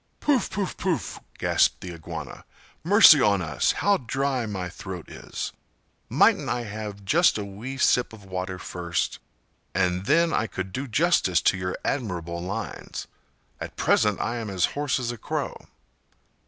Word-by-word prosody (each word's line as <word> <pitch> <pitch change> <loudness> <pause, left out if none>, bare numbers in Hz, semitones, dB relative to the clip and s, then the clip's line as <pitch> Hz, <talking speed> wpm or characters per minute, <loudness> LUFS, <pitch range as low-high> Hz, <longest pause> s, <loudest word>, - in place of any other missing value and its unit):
'" - - -43
"Pouf! 280 -5 +2
pouf! 195 -2 -3
pouf!" 175 - -2 0.2
gasped - - +2
the 90 -1 -6
Iguana. 80 -1 -8 0.4
"Mercy 175 -5 +8
on 100 -3 +4
us, 80 -5 +1
how 200 -1 +2
dry 130 -1 -1
my 95 -4 -3
throat 90 -1 -8
is! - - -6 0.6
Mightn't - - +4
I 120 - -1
have 105 -2 -7
just 170 - +4
a 105 - -3
wee 110 +7 -7
sip 125 -1 +3
of 105 -3 -13
water 95 0 -4
first? 90 -1 -3 0.6
and 90 0 +1
then 165 +3 +4
I 110 - +1
could 95 -1 -5
do 140 +6 -3
justice 125 - +3
to - - +4
your 90 -1 -3
admirable 85 -9 -2
lines; 100 +4 -5 0.5
at - - -7
present 105 -1 +2
I 120 - -1
am 115 -2 -4
as 95 -2 +2
hoarse 145 -1 0
as 120 -1 -2
a 120 - -8
crow!" - - -3
105 Hz, 160 wpm, -25 LUFS, 95-135 Hz, 0.6 s, Mercy